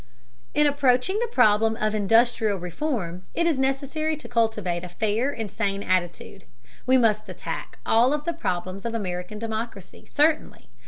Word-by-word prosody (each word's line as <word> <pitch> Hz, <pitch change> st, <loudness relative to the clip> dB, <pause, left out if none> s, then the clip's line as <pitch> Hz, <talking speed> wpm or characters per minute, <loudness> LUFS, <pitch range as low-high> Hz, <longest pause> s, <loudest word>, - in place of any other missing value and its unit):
In 300 Hz, -, +4 dB
approaching 285 Hz, +6 st, +2 dB
the 475 Hz, -, 0 dB
problem 220 Hz, -, +4 dB
of 215 Hz, -2 st, -1 dB
industrial 220 Hz, 0 st, +3 dB
reform 180 Hz, -, -3 dB
it 335 Hz, -, +1 dB
is 320 Hz, -5 st, +1 dB
necessary 280 Hz, +4 st, -1 dB
to 305 Hz, -, -10 dB
cultivate 215 Hz, -7 st, 0 dB
a 180 Hz, -, -6 dB
fair 220 Hz, +8 st, 0 dB
and 225 Hz, -7 st, -5 dB
sane 200 Hz, -2 st, -2 dB
attitude. 185 Hz, +1 st, -2 dB, 0.4 s
We 260 Hz, +1 st, +5 dB
must 215 Hz, -3 st, +2 dB
attack -, -, -6 dB
all 235 Hz, +4 st, +4 dB
of 295 Hz, 0 st, -2 dB
the 340 Hz, -, -1 dB
problems 185 Hz, -, -3 dB
of 230 Hz, 0 st, -3 dB
American 180 Hz, -1 st, -4 dB
democracy, 220 Hz, -3 st, -6 dB
certainly. 305 Hz, +1 st, +1 dB
225 Hz, 155 wpm, -25 LUFS, 195-270 Hz, 0.4 s, We